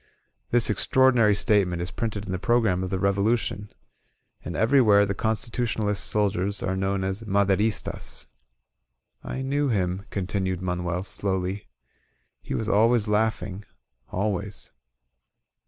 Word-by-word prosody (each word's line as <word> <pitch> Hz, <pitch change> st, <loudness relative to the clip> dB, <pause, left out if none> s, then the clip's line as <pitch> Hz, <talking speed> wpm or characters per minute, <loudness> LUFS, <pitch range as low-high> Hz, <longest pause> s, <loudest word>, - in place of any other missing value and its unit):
This 120 Hz, -2 st, +3 dB
ex 105 Hz, -, -1 dB
traordinary 125 Hz, -6 st, +4 dB
statement 100 Hz, -6 st, +2 dB
is 85 Hz, +1 st, -4 dB
printed 110 Hz, -4 st, -3 dB
in 95 Hz, -, -5 dB
the 95 Hz, -, -2 dB
program 110 Hz, -5 st, +2 dB
of 95 Hz, -, -3 dB
the 95 Hz, -, -1 dB
Revolution. 100 Hz, +2 st, 0 dB, 0.7 s
And 85 Hz, -, -5 dB
everywhere 110 Hz, -, +5 dB
the 100 Hz, -, -2 dB
Constitutionalist 110 Hz, -1 st, -1 dB
soldiers 100 Hz, -1 st, 0 dB
are 95 Hz, 0 st, -1 dB
known 95 Hz, 0 st, -1 dB
as 95 Hz, +3 st, -3 dB
"Maderistas." 100 Hz, 0 st, -1 dB, 1.0 s
"I 130 Hz, -, -4 dB
knew 140 Hz, +2 st, 0 dB
him," 95 Hz, -3 st, -1 dB
continued 95 Hz, -1 st, -2 dB
Manuel, 90 Hz, 0 st, -2 dB
slowly. 95 Hz, 0 st, -2 dB, 0.7 s
"He -, -, -4 dB
was 110 Hz, -, -2 dB
always 115 Hz, +1 st, +3 dB
laughing, 105 Hz, -2 st, -1 dB, 0.5 s
fidways." 100 Hz, +1 st, -3 dB
100 Hz, 120 wpm, -25 LUFS, 95-110 Hz, 1.0 s, everywhere